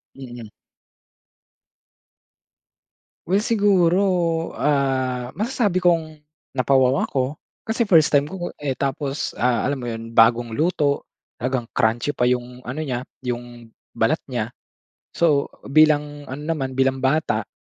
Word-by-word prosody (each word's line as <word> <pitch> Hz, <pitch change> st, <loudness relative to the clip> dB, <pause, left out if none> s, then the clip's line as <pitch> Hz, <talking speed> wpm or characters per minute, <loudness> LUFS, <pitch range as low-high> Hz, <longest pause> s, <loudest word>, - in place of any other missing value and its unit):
Mhm. 120 Hz, -4 st, -9 dB, 2.8 s
Well, 190 Hz, +3 st, +2 dB
siguro, 185 Hz, -5 st, +2 dB
ah, 130 Hz, -3 st, 0 dB
masasabi 215 Hz, -4 st, 0 dB
kong 165 Hz, -4 st, +1 dB, 0.4 s
napa-wow 130 Hz, 0 st, +3 dB
ako. 135 Hz, +2 st, -2 dB, 0.2 s
Kasi 230 Hz, 0 st, -1 dB
first 165 Hz, -5 st, +5 dB
time 145 Hz, -1 st, +3 dB
ko 185 Hz, -, -9 dB
ko, 175 Hz, -2 st, -4 dB
eh, 140 Hz, -3 st, -2 dB
tapos, 140 Hz, +2 st, -2 dB
ah, 120 Hz, -2 st, +2 dB
alam 140 Hz, +1 st, -1 dB
mo 120 Hz, -, -6 dB
yun 115 Hz, 0 st, -5 dB
bagong 115 Hz, +1 st, +4 dB
luto. 145 Hz, +2 st, 0 dB, 0.3 s
Talagang 125 Hz, -1 st, -2 dB
crunchy 115 Hz, +5 st, +1 dB
pa 125 Hz, -, +3 dB
yung 125 Hz, 0 st, -2 dB
ano 145 Hz, +5 st, -4 dB
niya, 125 Hz, -3 st, -3 dB, 0.2 s
yung 120 Hz, -2 st, -6 dB, 0.2 s
balat 115 Hz, +7 st, +2 dB
niya. 120 Hz, -4 st, -3 dB, 0.7 s
So, 150 Hz, -4 st, +3 dB, 0.2 s
bilang 145 Hz, 0 st, +2 dB
ano 140 Hz, +3 st, -6 dB
naman, 140 Hz, -5 st, -2 dB
bilang 135 Hz, 0 st, +2 dB
bata, 130 Hz, -5 st, 0 dB
135 Hz, 125 wpm, -22 LUFS, 125-160 Hz, 2.8 s, first